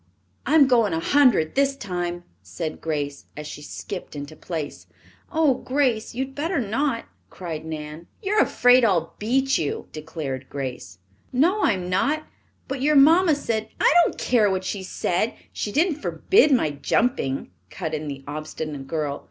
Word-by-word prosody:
"I'm 300 +1 +6
going 230 -8 +3
a 160 - 0
hundred 245 - +3
this 275 0 +2
time," 175 -6 -4 0.2
said 95 - -6
Grace, 145 -3 -3
as 150 - -6
she 150 - -8
skipped 180 +3 -7
into 145 +2 -7
place. 155 -3 -6 0.4
"Oh, 315 -4 +3
Grace, 255 -4 -1
you 265 +2 -1
had 270 - -14
better 325 +6 -2
not!" 230 +2 -1 0.2
cried 160 -4 -6
Nan. 155 +1 -7
"You're 420 +1 +2
afraid 245 0 +5
I'll 175 -7 +2
beat 265 +5 +1
you," 145 -3 -3
declared 150 -4 -6
Grace. 125 -9 -6 0.3
"No, 345 +11 +2
I'm 195 - +1
not. 275 +13 +1 0.4
But 270 -1 -4
your 300 +2 +3
mamma 320 +4 +6
said 225 -6 -2
" - - -32
"I - - +5
don't - - -2
care 225 -5 +3
what 190 -1 -1
she 195 +1 -3
said. 185 +3 -1 0.2
She 205 - -3
didn't 310 - +1
forbid 385 -6 +3
my 240 - +3
jumping," 140 - 0 0.2
cut 160 -4 -5
in 155 0 -3
the 135 -1 -6
obstinate 150 -1 -5
girl. 150 -3 -2
195 Hz, 160 wpm, -24 LUFS, -, 0.4 s, I'm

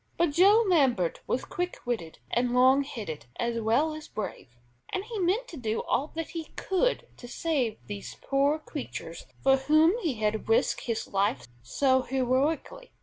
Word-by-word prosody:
But 340 -3 +2
Joe 400 +8 +6
Lambert 260 - +2
was 255 - -1
quick 355 0 -3
witted 225 -10 -3
and 245 +1 +1
"long 260 +2 +6
headed," 165 - -7
as 235 -1 -1
well 245 +9 +2
as 310 0 -8
brave, 210 -9 -6 0.4
and 375 - -2
he 450 -2 -5
meant 390 +8 +1
to 330 - -8
do 225 -3 -2
all 280 - 0
that 330 -1 -3
he 330 -2 -5
could 385 +7 0
to 245 - -10
save 255 -5 -1
these 205 -1 -7
poor 280 +2 +1
creatures 275 - -7 0.2
for 270 0 +5
whom 310 +5 +4
he 315 -8 -1
had 215 0 -1
risked 225 - +2
his 230 -2 -2
life 195 - 0
so 260 - +2
heroically. 270 - -1
265 Hz, 165 wpm, -28 LUFS, 225-325 Hz, 0.4 s, Joe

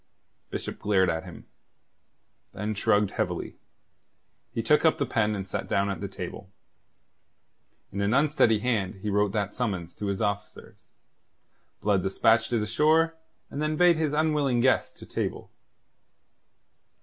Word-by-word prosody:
Bishop - - -5
glared 95 -3 +2
at 80 0 -4
him; - - -11 1.1
then 105 +2 -3
shrugging 105 0 +2
heavily, - - -3 0.9
he 115 - -3
took 150 +7 +3
up 160 - +4
the - - 0
pen 105 -1 0
and 95 -1 -5
sat - - -4
down 100 0 +1
at 100 - -5
the 100 - -3
table. 95 0 -8 1.4
In 100 - -3
an 100 +1 +1
unsteady 140 -4 +3
hand 110 -6 0
he 105 - -1
wrote 105 0 +2
that 100 -2 -1
summons 95 -9 -3
to 105 - -3
his 100 -1 -2
officers. 100 -3 -4 0.9
Blood 100 -2 +2
despatched 110 +4 +2
it 115 -3 +1
ashore; 160 +8 +3 0.4
and 145 - -4
then 155 0 0
bade 175 -1 +5
his 155 -2 0
unwilling 150 -5 +2
guest 130 +2 +2
to - - -11
table. - - -4
105 Hz, 145 wpm, -27 LUFS, 100-140 Hz, 1.4 s, bade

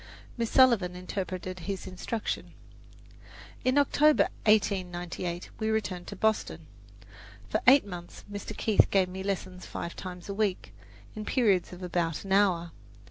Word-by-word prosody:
Miss 230 -2 -1
Sullivan 235 -9 +4
interpreted 185 0 -5
his 195 -2 -3
instruction. 195 +4 -4 1.1
In 255 +2 +2
October, 295 +1 +4 0.2
1898, 180 -4 0
we 220 -1 0
returned 190 -5 -2
to 205 - -6
Boston. 220 +2 0 0.8
For - - 0
eight 270 0 +8
months 175 -3 -9
Mr. 205 +1 -6
Keith 215 -2 +3
gave 190 -2 +3
me 190 +1 -6
lessons 190 -2 -4
five 170 - -5
times 180 -2 -8
a 200 - -3
week, 200 -2 -1 0.4
in 215 - -5
periods 205 -6 +2
of 180 0 -9
about 170 -3 -1
an 195 - -7
hour. 185 -4 +3
190 Hz, 135 wpm, -29 LUFS, 180-215 Hz, 1.1 s, eight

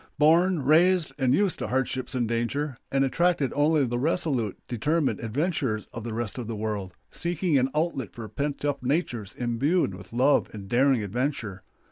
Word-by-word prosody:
born, 165 +2 +4
raised, 170 +4 +4
and 130 0 +3
used 200 0 +1
to - - -3
hardships 130 0 -2
and 120 -2 0
danger; 120 +5 -1 0.2
and 135 0 +3
attracted 165 -1 +1
only 145 0 +3
the 120 0 -2
resolute, 135 - 0
determined 145 +6 0
adventurers 125 - -1
of 115 - -6
the 115 - -4
rest 110 +1 -4
of 120 - -5
the 115 - -4
world, 105 -4 -4 0.2
seeking 175 -1 -1
an 130 -1 +3
outlet 150 - -1
for 115 -2 -8
pent 140 +7 -3
up 145 -1 -1
natures 125 - -2
imbued 125 - +1
with 95 -1 -11
love 130 +5 +3
of 100 -2 -8
daring 125 0 +3
adventure. 110 -3 -3
130 Hz, 170 wpm, -26 LUFS, 115-155 Hz, 0.2 s, born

